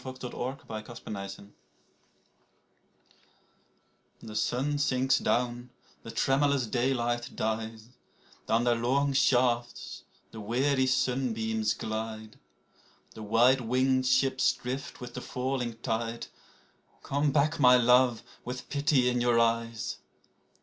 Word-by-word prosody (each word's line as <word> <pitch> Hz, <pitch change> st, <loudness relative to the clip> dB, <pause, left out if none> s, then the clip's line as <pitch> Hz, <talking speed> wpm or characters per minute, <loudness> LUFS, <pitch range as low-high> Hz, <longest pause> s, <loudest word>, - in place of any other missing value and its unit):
69 130 Hz, 0 st, -5 dB
PLAINTE 110 Hz, -1 st, -7 dB
ETERNELLE 100 Hz, -3 st, -8 dB, 2.7 s
THE 110 Hz, -1 st, -10 dB
sun 135 Hz, +7 st, 0 dB
sinks 130 Hz, -2 st, +2 dB
down, 120 Hz, 0 st, -1 dB, 0.3 s
the -, -, -10 dB
tremulous 135 Hz, +3 st, +1 dB
daylight 120 Hz, 0 st, -1 dB
dies. 110 Hz, 0 st, -3 dB, 0.6 s
(Down 115 Hz, +2 st, +2 dB
their 120 Hz, -1 st, +3 dB
long 135 Hz, +4 st, +1 dB
shafts 120 Hz, -2 st, +1 dB, 0.3 s
the 110 Hz, -, -8 dB
weary 130 Hz, +5 st, +1 dB
sunbeams 115 Hz, -4 st, 0 dB
glide.) 110 Hz, 0 st, -5 dB, 0.7 s
The 110 Hz, -, -10 dB
white 120 Hz, +5 st, +4 dB
winged 130 Hz, +2 st, +1 dB
ships 130 Hz, 0 st, +3 dB
drift 130 Hz, +2 st, -6 dB
with 125 Hz, -1 st, -8 dB
the 125 Hz, -, -6 dB
falling 125 Hz, -3 st, -3 dB
tide, 115 Hz, -1 st, -2 dB, 0.8 s
Come 145 Hz, +1 st, 0 dB
back, 155 Hz, +3 st, +1 dB
my 125 Hz, -2 st, +7 dB
love, 125 Hz, -1 st, +4 dB, 0.2 s
with 125 Hz, +1 st, -7 dB
pity 140 Hz, -3 st, +2 dB
in 125 Hz, -1 st, +1 dB
your 120 Hz, -1 st, +3 dB
eyes 115 Hz, -1 st, -1 dB
125 Hz, 110 wpm, -29 LUFS, 115-130 Hz, 2.7 s, my